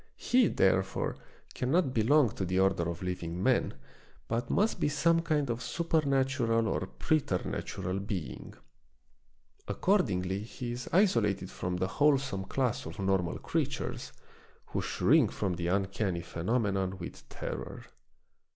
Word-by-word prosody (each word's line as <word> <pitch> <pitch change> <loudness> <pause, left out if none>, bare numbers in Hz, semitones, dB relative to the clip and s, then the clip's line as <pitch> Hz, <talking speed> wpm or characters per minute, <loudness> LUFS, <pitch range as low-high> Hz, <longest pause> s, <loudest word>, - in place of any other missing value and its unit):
He, 245 -3 +3
therefore, 95 0 +1 0.4
cannot 135 +2 +1
belong 125 +2 +4
to 95 - -4
the 90 +1 0
order 95 -3 +2
of 85 +1 -5
living 90 -1 -3
men, - - +2 0.5
but 120 +1 -2
must 215 +3 +1
be - - +2
some 165 +3 +3
kind 155 -4 0
of 120 0 -2
supernatural 135 -6 +1
or 95 -2 -1
preternatural 95 - -1
being. 90 - -5 1.1
Accordingly 100 - +1
he 120 +2 -6
is 125 +1 -5
isolated 115 - +2
from 90 0 -3
the 90 - 0
wholesome 135 -5 +1
class 125 - -1
of 80 - -8
normal 95 -3 0
creatures, - - -3 0.5
who - - -3
shrink - - +3
from 95 -3 -1
the 85 0 -3
uncanny 95 -1 0
phenomenon 95 0 -1
with 85 - -9
terror. - - -6
105 Hz, 125 wpm, -30 LUFS, 95-135 Hz, 1.1 s, belong